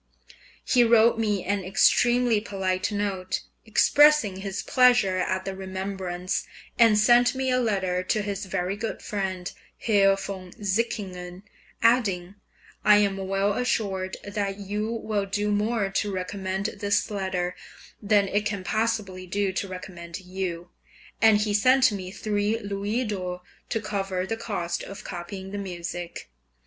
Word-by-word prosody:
He 245 -2 +4
wrote 230 0 +5
me 210 -4 0
an 200 0 -1
extremely 240 +4 +3
polite 190 -2 -2
note, 195 -3 -2 0.3
expressing 290 -3 +5
his 195 0 -4
pleasure 245 -7 +4
at 185 0 -1
the 195 0 -4
remembrance, 190 -1 -4 0.3
and 225 -3 +6
sent 240 +4 +5
me 260 0 0
a 255 - +3
letter 190 -6 0
to 215 +2 0
his 200 -1 -4
very 185 0 -2
good 225 +2 -5
friend, 190 -3 -3 0.3
Herr 195 -3 +4
von 195 -2 -7
Sickingen, 190 -3 -3 0.4
adding, 195 -7 +2 0.5
"I 210 - +7
am 200 -2 +2
well 195 +1 0
assured 195 -6 -1
that 200 -1 -3
you 210 +2 -3
will 215 -3 -2
do 205 +1 -1
more 205 -1 0
to 205 +1 -1
recommend 190 +1 -3
this 205 +1 0
letter, 185 -3 -2 0.5
than 205 -1 +3
it 205 +2 0
can 200 -2 -3
possibly 210 -4 -1
do 200 +1 -1
to 195 - -2
recommend 175 -1 -8
you." 180 -2 -5 0.5
And 220 -2 +6
he 210 0 0
sent 255 +4 +5
me 190 -3 -5
three 210 +2 -1
louis 205 +3 -2
d'or 180 -4 -4 0.3
to 225 - 0
cover 195 -3 -2
the 225 - -2
cost 175 -7 -3
of 195 - -8
copying 190 +2 -7
the 205 - -4
music. 175 - -6
200 Hz, 140 wpm, -26 LUFS, 185-215 Hz, 0.5 s, I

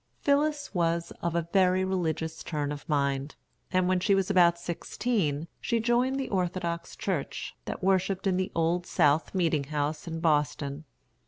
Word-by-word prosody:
Phillis 290 -1 +1
was 170 -2 0
of 170 -1 -1
a 170 -1 0
very 185 -1 +4
religious 165 -4 -2
turn 145 -3 -2
of 145 +1 -7
mind, 140 -1 0 0.4
and 185 -1 +2
when 185 0 +2
she 195 +2 +3
was 195 +1 +1
about 175 -3 +5
sixteen 170 -2 -2
she 235 -1 0
joined 245 +4 +2
the 265 - -2
Orthodox 175 -3 -2
Church, 180 -8 -3
that - - -5
worshipped 190 0 +1
in 190 -2 +2
the 185 0 -1
Old 170 +2 +1
South 150 +6 +2
Meeting 165 -6 +1
house 150 +2 -2
in 165 0 -4
Boston. 150 -2 0
170 Hz, 160 wpm, -28 LUFS, 155-190 Hz, 0.4 s, about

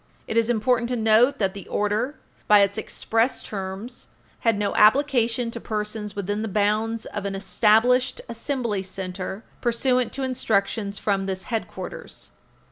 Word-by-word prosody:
It - - -3
is 230 0 +3
important 240 +1 +2
to 250 - 0
note 230 +4 +4
that 195 -4 0
the 200 -3 -9
order, 210 +7 0 0.3
by 210 -1 +7
its 200 0 +2
express 225 +3 0
terms, 195 +4 -6 0.3
had 230 -3 +2
no 205 -1 -1
application 235 0 +3
to 235 - -6
persons 210 -1 -4
within 205 +1 -2
the 225 - -2
bounds 215 +2 0
"of 205 - -5
an 195 -1 -2
established 225 +7 +3
Assembly 235 -3 -2
Center 190 +1 -5 0.2
pursuant 250 +1 +1
to 275 - -3
instructions 205 -5 0
from 195 -2 0
this 190 -1 -3
Headquarters 225 -2 -6
220 Hz, 145 wpm, -24 LUFS, 200-235 Hz, 0.3 s, by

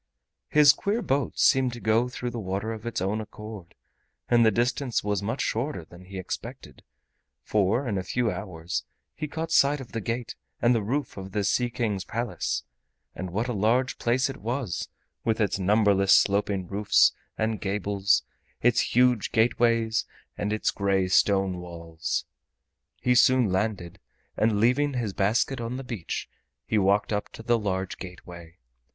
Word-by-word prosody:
His 150 -2 +7
queer 210 +9 -1
boat 140 -5 -1
seemed 130 -2 +4
to 120 - -7
go 115 +2 +2
through 125 -1 -4
the 120 - -5
water 100 +2 -3
of 110 +1 -8
its 115 - -2
own 100 +3 -1
accord, 105 -4 -10 0.5
and 120 -1 +4
the 110 - +6
distance 120 +3 0
was 105 -1 -1
much 115 +6 -2
shorter 115 - -2
than 90 +2 -14
he 95 +1 -11
had 95 - -3
expected, - - -7 0.6
for 105 - +1
in 100 -4 -1
a - - -4
few 120 +4 0
hours 90 -3 -4 0.3
he 155 - -4
caught 160 +2 -4
sight 145 -1 +4
of 130 - -10
the 115 - -3
gate 115 +3 -3 0.3
and 120 +1 +4
the 115 - +1
roof 130 +5 -2
of 95 0 -8
the 105 - 0
Sea 120 +5 +1
King's 105 -5 -2
Palace. 115 +4 -3 0.5
And 95 0 -5
what 110 +7 -2
a 125 - -2
large 115 +5 +1
place 125 +3 +2
it 135 - -6
was, 120 - -3 0.4
with 110 -1 0
its 105 -2 +1
numberless 100 0 +3
sloping 100 -2 +2
roofs 100 +3 +4 0.3
and 110 0 -1
gables, 100 0 +1 0.4
its 120 -1 +2
huge 125 -3 +3
gateways, 115 -1 +2 0.3
and 105 - -2
its 110 - 0
gray 95 -2 0
stone 95 -1 +3
walls! 85 -2 -4 0.7
He 125 - +2
soon 125 -3 +4
landed, 95 -3 -2 0.4
and 110 -2 +2
leaving 130 +5 +2
his 115 -5 -2
basket 115 +7 +1
on 120 +2 -4
the 135 - -6
beach, 115 -9 -5 0.4
he 110 - +1
walked 100 +2 +2
up 105 - -2
to 115 - -9
the 120 0 +2
large 95 -3 -3
gateway. 85 -2 -10
110 Hz, 170 wpm, -26 LUFS, 95-120 Hz, 0.7 s, His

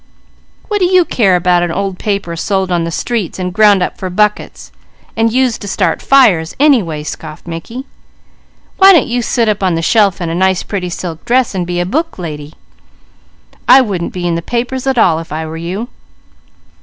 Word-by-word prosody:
"What 420 -2 -1
do 370 - +3
you 365 -1 +4
care 195 - +2
about 180 0 +2
an 175 -1 -1
old 195 +1 -3
paper 200 -5 -2
sold 190 +2 -1
on 170 -1 0
the - - -3
streets, 215 +2 -3
and 180 -1 -4
ground 205 -2 +4
up - - -5
for 185 - -4
buckets, 210 +3 -1 0.4
and 225 0 +1
used 255 -1 0
to 205 - -7
start 185 -4 -1
fires, 190 -13 +3
anyway?" 210 - +2
scoffed 155 +1 -8
Mickey. 200 +10 -7 0.9
"Why 385 0 +8
don't 330 - +4
you 245 +1 -1
sit 235 0 0
up 210 -2 0
on 185 -3 +1
the 165 - -2
shelf 200 0 +2
in 175 - -3
a 165 - -3
nice 190 +1 +1
pretty 185 -3 -4
silk 170 -2 -6
dress 250 -1 +1
and 180 -2 -3
be 175 0 -2
a 175 - 0
book 320 - -2
lady? 155 -4 -7 1.1
I 265 - +8
wouldn't 195 -8 -3
be 180 -1 -5
in 170 - 0
the 165 - -2
papers 250 +6 -3
at 265 -2 +1
all, 165 -8 +3
if 165 - -10
I 160 +1 -3
were 160 0 -7
you." 180 +8 -5
190 Hz, 200 wpm, -14 LUFS, 170-235 Hz, 1.1 s, Why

